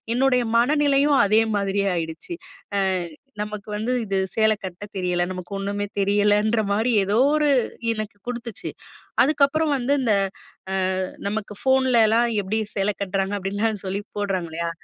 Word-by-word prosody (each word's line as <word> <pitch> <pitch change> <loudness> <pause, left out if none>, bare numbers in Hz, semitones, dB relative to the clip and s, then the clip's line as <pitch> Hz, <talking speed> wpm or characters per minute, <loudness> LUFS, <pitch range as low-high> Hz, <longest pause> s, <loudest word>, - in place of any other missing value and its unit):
என்னுடைய 250 -2 +3
மனநிலையும் 285 +2 +3
அதே 215 +2 +4 0.2
மாதிரியே 200 0 0
ஆயிடுச்சு. 165 - -5 0.4
அ - - +3 0.6
நமக்கு 210 0 -6
வந்து 225 +4 -2
இது 195 -1 -1 0.2
சேலை 220 -1 +3
கட்ட 185 +2 -7
தெரியல. 180 -1 0
நமக்கு 180 +1 -7
ஒண்ணுமே 200 +1 -2
தெரியலன்றமாரி 210 +2 +2
எதோ 205 +3 0 0.2
ஒரு 300 - +2 0.5
எனக்கு 215 -1 -6
குடுத்துச்சு. 235 -3 -5 0.5
அதுக்கப்புறம் 300 +1 +2
வந்து 260 +3 0
இந்த 225 -4 +2 0.9
அ - - 0 0.2
நமக்கு 210 0 -3
ஃபோன்ல 265 -2 +3
எல்லாம் 230 +2 +3
எப்பிடி 210 +4 -1 0.2
சேலை 200 +1 +1
கட்டுறாங்க, 195 0 -1
அப்பிடின்லாம் 205 +2 -2
சொல்லி 195 +2 -2 0.2
போடுறாங்க. 195 -4 -1
இல்லயா! 170 +1 -3
210 Hz, 135 wpm, -23 LUFS, 195-240 Hz, 0.9 s, அதே